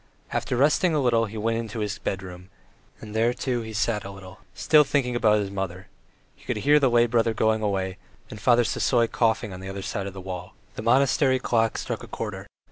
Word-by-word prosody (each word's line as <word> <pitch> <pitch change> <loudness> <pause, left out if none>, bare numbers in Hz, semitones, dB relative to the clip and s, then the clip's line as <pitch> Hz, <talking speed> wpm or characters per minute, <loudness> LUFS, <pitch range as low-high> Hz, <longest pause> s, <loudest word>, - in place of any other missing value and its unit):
After 125 - -1
resting 155 +5 +3
a - - +2
little 115 -4 +2
he 110 +2 -8
went 115 +1 0
into 115 -1 -6
his 105 -1 -3
bedroom, 90 -1 -6 0.5
and 105 -1 -9
there, 115 +2 +2
too, 125 -2 -2
he 110 -1 -7
sat 110 -1 -1
a 100 - -7
little, 95 -1 -11 0.2
still 155 -1 +5
thinking 130 -4 0
of 120 - -2
his 105 -3 +3
mother; 95 0 -5 0.5
he - - -22
could - - -3
hear 150 +1 +5
the 135 -3 +3
lay 120 0 +4
brother 115 -1 +1
going 110 0 +1
away, 95 -3 -2 0.3
and 105 - -9
Father 120 -1 +4
Sisoy 120 +1 +2
coughing 115 -2 0
the 95 0 -7
other 95 0 -6
side 100 +1 -3
of 100 - -7
the 95 - -8
wall. 90 0 -7 0.2
The - - -6
monastery 130 +3 +3
clock 115 -3 0
struck - - -4
a - - -9
quarter. - - -6
110 Hz, 210 wpm, -25 LUFS, 100-120 Hz, 0.5 s, still